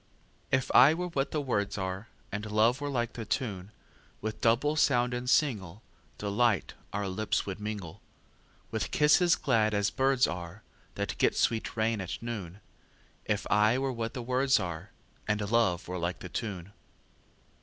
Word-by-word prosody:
If 130 -1 +1
I 135 +6 +8
were 180 +1 -3
what 140 -4 -1
the 155 - -1
words 105 -9 -1
are, 95 +3 -4 0.2
And 105 +1 -4
love 115 +5 +3
were 145 - -2
like 120 -3 -1
the 115 - -5
tune, 105 -5 -3 0.5
With 110 0 -5
double 125 +6 +3
sound 125 -5 +3
and 125 0 -4
singleDelight 105 - 0 0.2
our 100 0 -2
lips 100 +3 -1
would 100 0 -5
mingle, 105 -5 -6 0.7
With - - -2
kisses 165 +4 +4
glad 110 -6 +1
as 100 0 +1
birds 135 +2 +3
areThat 90 +4 -7
get - - +2
sweet 115 0 0
rain 110 -1 +1
at 95 - -4
noon; 105 -5 -6 0.6
If 105 -1 -1
I 105 +3 +4
were 135 0 -1
what 115 +1 -4
the 125 - -4
words 130 +2 +3
areAnd 95 +3 -5
love 110 -7 +2
were 90 0 -4
like 85 +2 -2
the 90 - -7
tune. 100 -2 -5
110 Hz, 155 wpm, -29 LUFS, 100-125 Hz, 0.7 s, I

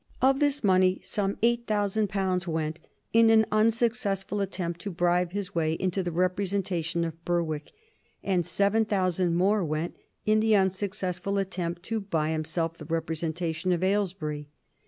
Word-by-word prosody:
Of 270 +1 +3
this 290 -2 +1
money 185 -1 +4
some 200 -1 -1
eight 235 0 +2
thousand 205 0 +1
pounds 190 -2 -1
went 160 -1 -2 0.3
in 230 0 +6
an 220 0 +6
unsuccessful 215 -2 +1
attempt 175 -3 -3
to 205 - -4
bribe 175 0 +1
his 200 -2 -4
way 160 -2 +1
into 185 +3 -1
the 175 -1 -3
representation 180 -1 0
of 165 0 -7
Berwick, 165 -4 -1 0.5
and 185 -3 +1
seven 200 +6 +2
thousand 185 -4 +1
more 195 +3 +3
went 155 +1 -2 0.3
in 215 0 +4
the 210 -3 +4
successful 195 0 -3
attempt 180 -3 -3
to 225 +3 -2
buy 160 -6 -1
himself 165 +1 -2
the - - -8
representation 165 +1 -2
of 175 0 +1
Aylesbury. 185 -7 -1
185 Hz, 150 wpm, -27 LUFS, 170-205 Hz, 0.5 s, in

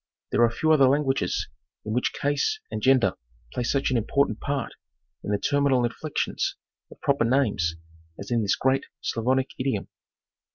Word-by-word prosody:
There - - +2
are 120 - +6
few 155 +7 +1
other 140 -4 +6
languages 135 -1 0 0.4
in 110 - -2
which 125 - +1
case 145 - 0
and - - -3
gender 130 -2 +4 0.4
play - - -2
such 135 +3 0
an 125 - +2
important 115 0 +1
part 140 -3 -2 0.5
in - - -5
the 105 - +2
terminal 140 0 +2
inflections 145 +6 -2 0.3
of - - -15
proper 140 -3 +2
names 115 -10 +1 0.4
as - - -8
in 120 -1 +2
this 100 -2 +2
great 135 +1 +1
Slavonic 130 +3 0
idiom. 130 -6 -1
130 Hz, 160 wpm, -26 LUFS, 115-140 Hz, 0.5 s, are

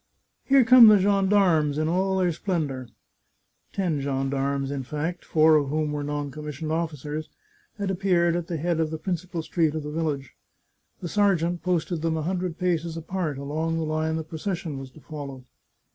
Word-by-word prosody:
" - - -50
Here 270 -1 +7
come 240 0 +9
the 210 -1 +8
gendarmes 190 -6 +3
in 155 0 0
all 190 +3 +1
their 180 -2 +2
splendour! 155 -8 -2 0.4
" - - -47
Ten 170 -7 -1
gendarmes, 135 0 -1
in 140 -1 -3
fact, 150 +6 -4
four 155 0 +5
of 145 -2 0
whom 155 0 -1
were 150 0 -2
non 145 -1 -3
commissioned 150 +1 -5
officers, 155 -2 -3 0.5
had 200 -2 -2
appeared 175 -3 +2
at 175 -1 -3
the 170 - -3
head 170 +1 -1
of 160 -1 +1
the 160 - -4
principal 175 0 -4
street 160 -2 0
of 155 - -3
the 150 - -5
village. 150 -4 -3 0.7
The 175 - -4
sergeant 175 -3 +1
posted 175 -2 -1
them 160 0 0
a 155 - -2
hundred 180 0 -2
paces 170 -3 -1
apart, 165 -3 -3
along 155 +4 -2
the 165 - -1
line 155 +1 -1
the 160 - -2
procession 160 -1 -4
was 135 -1 -8
to 155 - -17
follow. 140 -4 -8
160 Hz, 185 wpm, -25 LUFS, 150-180 Hz, 0.7 s, come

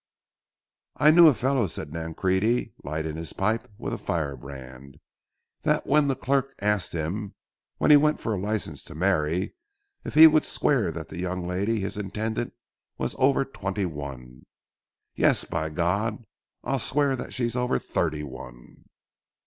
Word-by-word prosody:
"I 150 +1 +6
knew 170 +1 +8
a 150 - +7
fellow," 130 -1 +1
said 75 -3 -6
Nancrede, 95 +8 0
lighting 80 +1 -3
his 80 -1 -6
pipe 110 +3 -1
with - - -4
a - - -4
firebrand, 70 -3 -5 0.6
"that - - +1
when 145 0 +3
the 135 - +1
clerk 135 +1 0
asked 105 -1 0
him, 90 +6 -3 0.4
when - - +3
he 150 - +10
went 150 +1 +2
for 115 - -2
a 100 - -2
license 105 +1 -2
to 80 - -10
marry, 85 -1 0 0.5
if - - -7
he 160 +1 +11
would 155 -1 +6
swear - - +1
that - - -7
the 85 - -7
young 90 0 -3
lady—his 100 +3 -1
intended—was 110 +4 -5
over 135 +1 +3
twenty 100 -6 -3
one, 70 -6 -8 0.7
said: - - -6
'Yes, - - +4
by 80 -1 -2
G—, 100 +8 -1 0.4
I'll 135 +2 0
swear 140 +3 +1
that 130 - -7
she's 120 -2 -2
over 125 - +1
thirty 75 +2 -2
one.'" 60 -3 -11
100 Hz, 150 wpm, -26 LUFS, 80-125 Hz, 0.7 s, he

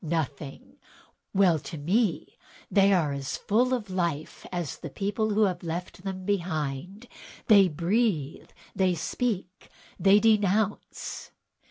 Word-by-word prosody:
Nothing; 150 -4 -4 0.5
well, 185 -5 +4
to 160 - -8
me 185 +5 0 0.4
they 200 -1 +5
are 165 -7 +2
as 140 -1 -4
full 245 +5 +1
of 225 -6 -2
life 170 -5 -3
as 175 -6 -4
the 160 - -7
people 205 +7 -1
who 215 - +4
have 185 -4 0
left 175 +2 -5
them 190 -1 -5
behind; 175 - -3 0.4
they 200 -4 +7
breathe, 170 - -1 0.3
they 185 -2 +2
speak, 190 +2 -3 0.3
and - - -8
they 200 +2 +8
denounce!" 210 -1 0
185 Hz, 130 wpm, -27 LUFS, 160-205 Hz, 0.5 s, they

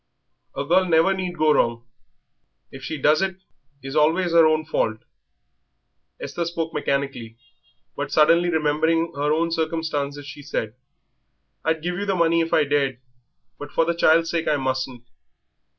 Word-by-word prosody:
"A 140 - -3
girl 185 +5 +3
never 165 +2 +3
need 185 -2 -4
go 155 0 +3
wrong; 115 -2 0 0.9
if 135 - -10
she 160 - -4
does 150 +5 +3
it 190 -1 -2 0.5
is 135 +1 -6
always 165 +3 +2
'er 165 -1 +6
own 155 0 +1
fault." 110 -7 -1 1.2
Esther 155 +5 -4
spoke 165 -1 -4
mechanically, 140 -6 -3 0.6
but - - -4
suddenly 170 +3 +4
remembering 160 +1 +1
her 145 +1 -1
own 165 +2 +1
circumstances 160 -3 -2
she 145 - -10
said: 115 -7 -4 0.9
"I'd 160 -1 -1
give 175 +1 -2
you 205 - -3
the 195 - +1
money 170 -1 +2
if 165 - -3
I 155 - +4
dared, 140 -3 0 0.6
but 145 0 -8
for 165 - +2
the 170 - 0
child's 165 0 +3
sake 165 -1 -2
I 150 - +2
mustn't." 130 -2 -3
155 Hz, 155 wpm, -23 LUFS, 140-170 Hz, 1.2 s, er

